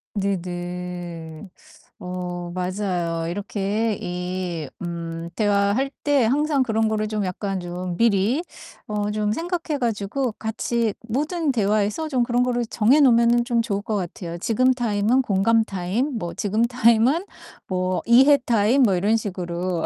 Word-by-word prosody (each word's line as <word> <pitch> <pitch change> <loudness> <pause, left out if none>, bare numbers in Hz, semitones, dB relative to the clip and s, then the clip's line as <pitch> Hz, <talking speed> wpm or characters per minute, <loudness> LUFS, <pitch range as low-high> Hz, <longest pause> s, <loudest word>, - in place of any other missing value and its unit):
네네. 175 -3 -4 0.5
어 180 -1 -5
맞아요. 180 -3 -2
이렇게 205 +3 -1
이 180 +1 -3 0.3
음 170 -1 -5
대화할 205 +5 +2
때 285 -4 +3
항상 290 +4 +2
그런 225 -2 +1
거를 215 0 -1
좀 210 -1 -2
약간 190 +1 -3
좀 175 0 -5
미리 230 - +2 0.4
어 210 -1 -1
좀 210 0 0
생각해 330 - -2
가지고 235 +2 -1
같이 225 0 -1
모든 300 +6 0
대화에서 210 +5 0
좀 255 -4 +2
그런 245 0 +1
거를 245 -1 0
정해 230 +6 +3
놓으면은 235 -3 +4
좀 235 -2 +1
좋을 205 -3 -2
것 215 +1 -3
같아요. 175 -2 -4
지금 255 +8 +2
타임은 235 0 +1
공감 225 +1 +3
타임 220 +7 -2
뭐 175 -5 -4
지금 215 +3 0
타임은 245 - +3 0.4
뭐 185 0 -1
이해 265 +5 +6
타임 235 +4 +3
뭐 195 -6 +4
이런 205 +5 +2
식으로. 180 -4 -3
210 Hz, 265 characters per minute, -23 LUFS, 180-240 Hz, 0.5 s, 이해